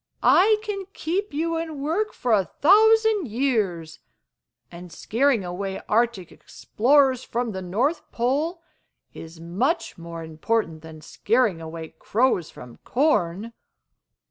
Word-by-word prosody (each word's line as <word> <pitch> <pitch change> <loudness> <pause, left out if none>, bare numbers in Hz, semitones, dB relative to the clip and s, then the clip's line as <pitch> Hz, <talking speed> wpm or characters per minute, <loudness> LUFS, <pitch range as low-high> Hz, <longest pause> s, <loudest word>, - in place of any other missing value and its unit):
I 425 +3 +5
can 400 -3 -4
keep 380 +6 -2
you 330 +3 -1
in 320 -3 -5
work 340 +10 -1
for 245 - -3
a 195 -3 +3
thousand 435 +1 +4
years, 210 - -1 0.7
and 175 0 -11
scaring 235 - 0
away 190 +2 -4
Arctic 220 -5 0
Explorers 260 +1 +1
from 235 -1 -3
the 190 -2 -5
North 230 - -2
Pole 300 +8 -1 0.5
is 165 0 -11
much 195 - -2
more 170 0 -8
important 160 +1 -2
than 160 -1 -12
scaring 215 - 0
away 160 0 -8
crows 225 -7 +1
from 125 -1 -13
corn. 225 - 0
235 Hz, 120 wpm, -24 LUFS, -, 0.7 s, I